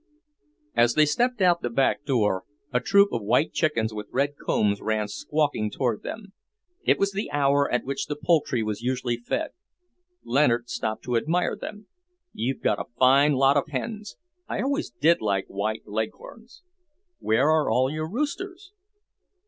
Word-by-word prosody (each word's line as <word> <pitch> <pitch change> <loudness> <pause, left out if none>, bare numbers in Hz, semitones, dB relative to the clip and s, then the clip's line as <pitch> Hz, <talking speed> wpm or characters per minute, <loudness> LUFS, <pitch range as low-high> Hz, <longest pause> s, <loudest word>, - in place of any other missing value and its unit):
As 120 0 +3
they 155 - +6
stepped 240 - 0
out 175 -2 +5
of - - -33
the 120 - -2
back 135 +4 +1
door, 105 -9 +1 0.3
a 125 - +3
troop 200 +9 +4
of 115 - -2
white 120 +9 +1
chickens 115 -9 0
with 105 -1 -6
red 140 +2 0
combs 100 -6 0
ran 110 -1 -1
squawking 145 -5 -1
toward 120 -1 -1
them. 205 -3 -8 0.5
It - - +3
was 200 0 +1
the 200 +2 -3
hour 140 0 +2
at 125 - +1
which 140 +1 -3
the 150 - -3
poultry 150 -6 +1
was 105 0 -3
usually 125 -1 -1
fed. 280 - -3 0.7
Leonard 120 -2 +2
stopped 110 0 -3
to 125 -2 0
admire 165 +9 0
them. 210 0 -8 0.5
"You've 130 +4 -3
got - - +1
a - - -6
fine 140 +3 +5
lot 135 +1 +4
of 140 - 0
hens. 210 - -5 0.3
I - - -2
always 280 +4 -1
did 165 +4 +2
like 100 -3 0
white 110 +3 -3
leghorns. 225 - -6 0.6
Where 130 +8 +2
are 155 -1 +2
all 130 +4 +2
your 155 +1 -3
roosters?" 360 - -4
140 Hz, 165 wpm, -25 LUFS, 115-170 Hz, 0.7 s, they